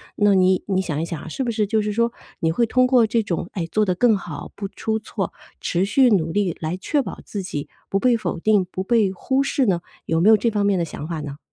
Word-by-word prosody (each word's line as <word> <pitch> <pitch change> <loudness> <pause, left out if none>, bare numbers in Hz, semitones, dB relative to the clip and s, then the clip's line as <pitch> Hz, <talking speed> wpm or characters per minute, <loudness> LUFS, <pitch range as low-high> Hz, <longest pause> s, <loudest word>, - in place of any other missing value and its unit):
那 205 -1 +4
你 185 0 +3
你 190 -1 +1
想 155 -5 -3
一 165 - -1
想 165 -2 -5
啊， - - -9
是 260 - -3
不 240 - -1
是 215 -2 0
就 220 0 +1
是 210 - -2
说 235 +1 +1 0.3
你 165 -1 +1
会 235 +8 +2
通 255 +2 +3
过 250 -3 +5
这 230 +1 +1
种， 175 -1 -3
哎， 170 -4 -3
做 215 - +2
得 185 - +1
更 225 0 +4
好， 160 -6 -8
不 200 -1 -4
出 220 +2 -2
错， 210 -3 -4 0.3
持 175 +1 0
续 250 +5 +4
努 165 -7 +2
力 190 -3 0
来 160 +3 -3
确 285 +9 0
保 - - -7
自 200 -3 -5
己 150 -6 -5 0.2
不 195 - +1
被 250 +1 +3
否 180 -5 -3
定、 205 0 +3
不 185 - -3
被 210 -2 +2
忽 265 +8 0
视 270 -1 +1
呢？ 175 -3 +1 0.2
有 165 0 +1
没 200 - +5
有 220 - +8
这 230 - +1
方 205 -1 0
面 200 -1 +2
的 - - +1
想 150 -1 -7
法 165 -2 -4
呢？ 145 -1 -7
200 Hz, 285 characters per minute, -22 LUFS, 175-225 Hz, 0.3 s, 有